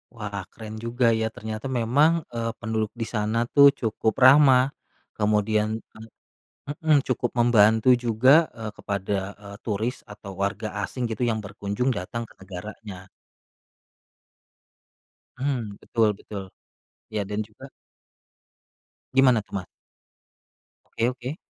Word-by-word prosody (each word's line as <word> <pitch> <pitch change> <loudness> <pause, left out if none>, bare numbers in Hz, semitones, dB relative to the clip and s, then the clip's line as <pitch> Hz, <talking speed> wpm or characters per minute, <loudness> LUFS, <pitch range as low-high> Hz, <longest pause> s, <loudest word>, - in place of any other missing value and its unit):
Wah 100 -3 -5
keren 110 -1 -9
juga 120 +1 0
ya 110 0 0
ternyata 110 +2 -6
memang, 130 +6 +3 0.2
eee, 115 0 -2
penduduk 110 -2 -2
di - - 0
sana 110 +2 -1
tuh 140 -1 +9
cukup 110 -1 0
ramah 135 -1 +6 0.4
kemudian 105 0 +1 0.3
eee, 110 +1 -12 0.6
heeh 155 +1 +1
cukup 120 -1 0
membantu 110 0 +4 0.2
juga, 130 +8 +5
eee, 110 -2 -6
kepada, 100 0 -2 0.3
eee, 100 0 -9
turis 110 +4 -2
atau 105 -1 -10
warga 100 +2 -2 0.2
asing 125 - -6
gitu 110 - -4
yang 110 -2 -1
berkunjung 100 +6 -2
datang 115 +6 -5
ke - - -18
negaranya. 95 +1 -9 2.3
Hmm, 125 -7 -2
betul 110 -2 +2
betul. 100 -2 -7 0.7
Ya 105 -1 -1
dan 105 +1 -3
juga 110 +6 -13 1.4
Gimana 130 -4 +5
tuh, 100 - -22
Mas? 90 - -10 1.2
Oke 115 +2 0
oke. 130 +4 -6
110 Hz, 120 wpm, -25 LUFS, 105-125 Hz, 2.3 s, tuh